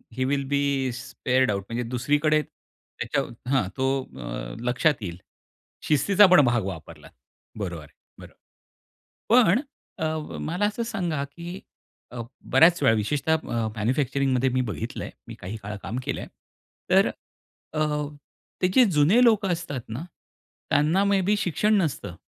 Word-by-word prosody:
He 130 - 0
will 140 +1 0
be 140 -2 0
spared 130 0 0
out. 100 -1 -2
म्हणजे 120 +1 -2
दुसरीकडे 145 +5 +2
त्याच्या 140 - -6 0.3
हां, 135 -9 +2
तो 135 0 0 0.6
लक्षात 125 +4 +2
येईल. 90 -4 -5 0.7
शिस्तीचा 190 +8 +5
पण 180 -4 +7
भाग 120 -3 +2
वापरला 85 -5 -8 0.5
बरोबर 85 -6 -4
आहे, 75 0 -18 0.3
बरोबर. - - -12 1.0
पण 230 -1 +5 0.4
अ, 155 -1 -3
मला 180 +6 -1
असं 210 +3 -1
सांगा 175 -11 -2
की 175 +3 -8 0.5
अ, 120 - -5 0.3
बऱ्याच 165 +6 +6
वेळा 115 - +5
विशेषतः 145 +9 +1 0.4
मॅन्युफॅक्चरिंगमध्ये 130 +3 +1
मी 130 +1 +1
बघितलंय 85 -8 -5 0.2
मी - - -8
काही 100 +5 -6
काळ 105 +2 -5
काम 115 +5 -4
केलंय - - -4 0.6
तर - - +5 0.6
अ, 155 - -2 0.8
ते 185 - +4
जे 260 - +7
जुने 170 +12 +5
लोकं 215 -5 +4
असतात 155 -7 -5
ना 120 +9 -5 0.7
त्यांना 160 +7 +3
मे 200 -1 +3
बी 210 - +4
शिक्षण 205 +5 +1
नसतं, 135 - -3
140 Hz, 135 wpm, -25 LUFS, 125-170 Hz, 1.0 s, पण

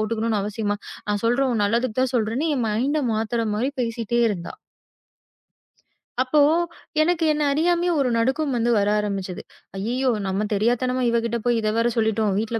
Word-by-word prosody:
போட்டுக்கணும்னு 220 -1 0
அவசியமா? 205 0 -2 0.3
நான் 205 0 -1
சொல்றேன் 255 +3 +2
உன் 215 -3 +1
நல்லதுக்கு 235 +2 -1
தான் 260 0 -1
சொல்றேன்னு" 240 +8 0
என் 245 - 0
மைண்ட் 265 +8 0
மாத்துற 225 +1 -1
மாரி 250 +6 0
பேசிட்டே 235 0 -1
இருக்கா. 180 -5 -5 1.7
அப்போ 280 +4 +1 0.6
எனக்கு 330 +1 +1
என்ன 300 0 0
அறியாமயே 345 +3 +1
ஒரு 260 -2 +2
நடுக்கம் 265 +4 0
வந்து 235 0 +1
வர 205 0 +2
ஆரம்பிச்சது. 195 -3 -3 0.4
ஐயய்யோ! 250 +5 0 0.2
நம்ம 195 +3 -1
தெரியாத்தனமா 245 +4 +1
இவகிட்ட 235 0 0
போய் 240 -1 +2
இத 215 0 0
வேற 230 +1 +2
சொல்லிட்டோம். 220 -2 +1
வீட்டுல 225 +1 -2
230 Hz, 155 wpm, -23 LUFS, 215-255 Hz, 1.7 s, சொல்றேன்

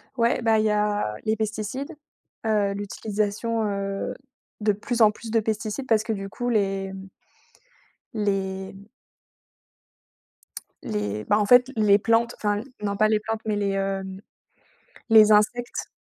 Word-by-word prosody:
Ouais, 235 0 +1
bah, 225 -1 +3
il 215 - +1
y - - +3
a 210 - 0
les 220 0 +2
pesticides, 220 +8 -4 0.5
heu, 210 -2 +1
l'utilisation, 210 +2 -2
heu, 195 -1 -3 0.5
de 210 0 +3
plus 230 +4 -3
en 215 -1 +7
plus 220 +1 -9
de 225 - +3
pesticides 220 +4 -3
parce 220 -2 +3
que, 225 - -2
du 195 -1 -5
coup, 245 +5 -3
les 195 -3 0 1.2
les 195 -1 -3 2.0
les, 105 0 -3
bah, 210 +1 +3
en 210 - +2
fait, 250 +3 +6
les 210 -2 +5
plantes, 230 +2 +1
enfin, 205 -1 0 0.2
non 200 -1 -1
pas 215 +1 +4
les 215 - +3
plantes 220 +1 -4
mais 215 - 0
les, 200 -1 0
heu, 195 0 -1 1.1
les 215 -1 +8
insectes 225 +4 +1
210 Hz, 140 wpm, -25 LUFS, 200-225 Hz, 2.0 s, les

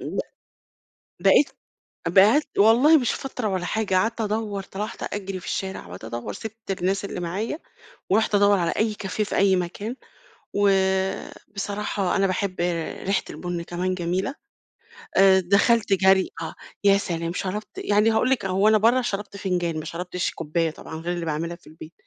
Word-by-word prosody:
ب - - -5 1.0
بقيت 290 - +5 0.6
بقيت 205 - +5
والله 240 +10 +6
مش 250 -5 +1
فترة 255 -4 -4
ولا 185 -2 -2
حاجة، 210 -3 -1
قعدت 225 +4 +1
أدوّر 210 -2 -2
طلعت 205 +3 -5
أجري 195 -2 -4
في - - -13
الشارع 190 - -4
وقعدت 90 +4 -10
أدوّر، 120 +1 -5
سِبت 220 -2 -7
الناس 195 +2 0
اللي 195 - -5
معايا 195 - -3 0.5
ورُحت 215 +1 +2
أدوّر 200 0 +5
على 170 -1 +1
أي 220 -1 0
كافيه 205 +1 -3
في 205 - -4
أي 195 -1 +4
مكان، 195 +7 -3 0.6
وبصراحة 195 0 0
أنا 195 0 +3
باحب 185 -1 -2 0.5
ريحة 195 0 +1
البُن 175 -1 -4
كمان 180 +2 -2
جميلة، 185 +8 -2 0.8
آآ، 190 -1 +7
دخلت 200 +3 +3
جرْي 190 0 +4
آه، 160 -1 -5 0.3
يا 200 -1 +6
سلام، 170 -3 -3
شربت 200 +3 -4
يعني 210 +2 +3
هاقول 220 +3 +2
لِك 265 -7 +1
هو 195 +2 +2
أنا 215 0 +6
برّا 235 +4 +4
شربت 200 -3 -4
فنجان 175 -4 -1
ما - - -7
شربتش 180 +1 -3
كوباية 165 0 -1
طبعًا 160 - -10
غير 170 +2 -3
اللي 175 -1 -4
باعملها 165 +2 -2
في 170 - -21
البيت، 155 +1 -12
195 Hz, 160 wpm, -24 LUFS, 180-210 Hz, 1.0 s, آآ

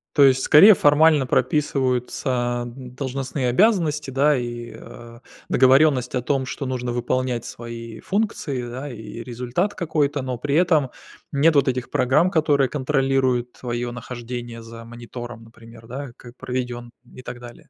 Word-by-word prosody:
То 145 - +6
есть, 130 -1 +4
скорее, 195 +8 +8
формально 150 -3 +4
прописываются 125 -4 0
должностные 130 +1 -4
обязанности, 155 - +2
да, 140 +2 +3
и, 120 -1 -5
а, 115 0 -12 0.3
договоренность 130 0 +4
о 125 - 0
том, 135 +1 -1
что 135 - -5
нужно 125 -2 -3
выполнять 120 0 -1
свои 115 -1 -8
функции, 195 - -2
да, 130 +4 -6
и 115 0 -8
результат 125 - -2
какой-то, 150 -4 -1
но 130 -1 -4
при 140 +4 -2
этом 160 -5 +3 0.4
нет 155 +3 +3
вот 140 -1 +4
этих 125 -1 -3
программ, 145 +8 +2
которые 150 -6 +2
контролируют 130 -3 0
твоё 120 -1 -4
нахождение 120 -1 -7
за 115 0 -11
монитором, 120 0 -9
например, 115 0 -15
да, 135 +2 -6
как 120 0 -14
проведён 125 -2 -5 0.2
и - - -11
так 120 -1 -8
далее. 120 -1 -13
130 Hz, 140 wpm, -22 LUFS, 120-145 Hz, 0.4 s, скорее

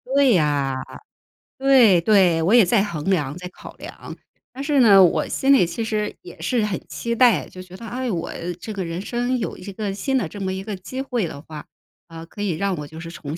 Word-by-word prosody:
对 265 -8 +5
啊， 145 -3 0 0.8
对 245 -10 +5
对， 180 -4 +4
我 175 +6 +1
也 230 -6 +7
在 200 +3 +3
衡 165 -8 -5
量 150 -3 -1
在 180 0 -7
考 - - -13
量。 - - -10 0.3
但 270 +2 -7
是 290 -2 +1
呢， 200 -5 +7
我 175 - +2
心 275 +1 +2
里 180 -11 +4
其 225 +7 -4
实 215 -1 -2
也 - - -12
是 235 -5 0
很 200 -3 -3
期 235 0 -4
待， 240 -4 +4
就 185 - -11
觉 185 0 -12
得 230 - -10
哎， 250 +2 -4
我 175 -4 -3 0.3
这 215 +3 -7
个 195 -2 -3
人 165 +1 -5
生 245 +3 -1
有 225 - -4
一 200 +2 -9
个 200 0 -4
新 265 +6 -1
的 200 -10 -1
这 205 +4 -9
么 190 -1 -2
一 190 +1 -5
个 210 -1 -5
机 190 +8 -8
会 240 -9 -2
的 145 0 -9
话， 155 -2 -10 0.4
啊， 165 0 -10
可 205 +4 -10
以 200 -3 0
让 200 -1 -1
我 150 -1 -6
就 160 +2 -11
是 165 0 -8
重 155 -1 -7
195 Hz, 245 characters per minute, -22 LUFS, 170-235 Hz, 0.8 s, 也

